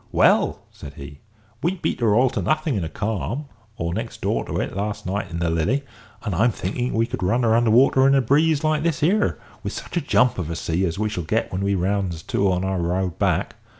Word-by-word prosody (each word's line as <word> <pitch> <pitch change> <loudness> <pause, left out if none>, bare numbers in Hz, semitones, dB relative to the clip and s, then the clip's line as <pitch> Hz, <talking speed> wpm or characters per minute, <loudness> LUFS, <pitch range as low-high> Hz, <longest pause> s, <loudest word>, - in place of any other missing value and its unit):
"Well," - - +3
said 70 -1 -11
he, 70 +1 -10 0.4
"we 175 +3 0
beat 170 -3 -2
her 110 -4 +3
all 125 +2 +4
to 130 - -2
nothing 155 -1 0
in 100 -6 -1
a 80 - -4
calm, 110 - -3 0.3
or 85 0 -2
next - - -5
door - - 0
to - - -3
it, - - -3
last 105 +1 -3
night 95 0 -2
in 85 - -5
the 85 -1 0
Lily, 85 - +1 0.4
and 105 -5 -2
I'm 110 +8 +3
thinking 120 +4 -3
we 115 +1 +3
could 120 - -5
run 110 +7 +1
her 110 -1 +3
under 120 -1 +3
water 130 +3 +5
in 135 - +5
a 135 - +4
breeze 150 +4 +3
like 155 -1 +2
this 165 -2 -1
here, 200 +7 +2 0.2
with - - -4
such - - -6
a - - +2
jump 125 -5 +2
of 85 -3 -3
a 85 - -3
sea 85 +3 -1
as 85 -1 -2
we 110 +1 0
shall 90 -5 -3
get 80 - -1
when 95 - -2
we 100 0 +1
rounds 95 -3 -1
to 100 -1 +1
on 90 +1 0
our 95 -1 -1
road 90 +1 -1
back. - - 0
105 Hz, 245 wpm, -23 LUFS, 90-130 Hz, 0.4 s, water